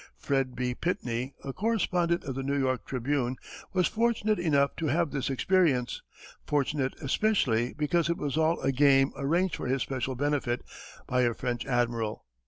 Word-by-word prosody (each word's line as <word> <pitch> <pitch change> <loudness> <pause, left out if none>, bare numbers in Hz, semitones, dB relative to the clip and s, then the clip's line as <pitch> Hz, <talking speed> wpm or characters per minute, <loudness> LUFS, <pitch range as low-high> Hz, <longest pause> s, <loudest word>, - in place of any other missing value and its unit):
Fred 130 - -1
B. 125 0 -1
Pitney, 125 -4 -2
a 135 - -5
correspondent 180 - +1
of 135 - -4
the 135 - -3
New 140 +1 -1
York 130 -2 0
Tribune, 130 0 -1 0.4
was 185 -2 +2
fortunate 220 -2 +1
enough 140 -5 +2
to 165 - -1
have 165 +3 +1
this 140 -1 -2
experience, 135 -4 +1 0.5
fortunate 140 -2 0
especially 130 - +1
because 155 +2 +1
it 170 - 0
was 145 -2 -2
all 160 +1 +2
a 135 - +1
game 135 0 +4
arranged 170 +6 +1
for - - -5
his 130 0 +1
special 130 -1 -3
benefit 140 -3 -1 0.4
by 125 0 +1
a 120 -2 +2
French 120 -1 -3
admiral. 120 -4 -1
140 Hz, 165 wpm, -28 LUFS, 125-165 Hz, 0.5 s, game